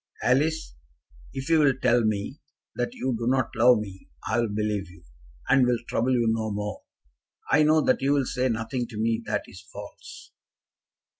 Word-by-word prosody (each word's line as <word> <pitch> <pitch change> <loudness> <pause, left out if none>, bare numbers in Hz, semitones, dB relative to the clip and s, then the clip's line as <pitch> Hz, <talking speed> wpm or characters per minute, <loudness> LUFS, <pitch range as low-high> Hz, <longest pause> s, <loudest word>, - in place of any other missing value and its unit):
"Alice, 150 - +1 0.6
if 135 0 -6
you 165 -1 +4
will 145 -3 +4
tell 120 -1 +3
me 110 +5 -2 0.3
that 120 - -3
you 130 -1 -2
do 115 +1 -3
not 130 -1 +1
love 120 +2 +6
me, 95 -6 -8 0.2
I - - +1
will 115 -2 0
believe 105 -3 -2
you, 90 - -17 0.4
and 135 -1 +5
will 125 -1 +2
trouble 130 +3 0
you 120 -2 +2
no 110 -1 0
more. 105 0 -4 0.7
I 150 - +5
know 155 +1 +4
that - - +1
you 140 +1 +2
will 140 -2 +1
say 125 +1 -1
nothing 115 +2 -2
to 115 -3 -10
me 115 +1 0
that - - -1
is - - -13
false. - - -12
120 Hz, 180 wpm, -26 LUFS, 110-135 Hz, 0.7 s, love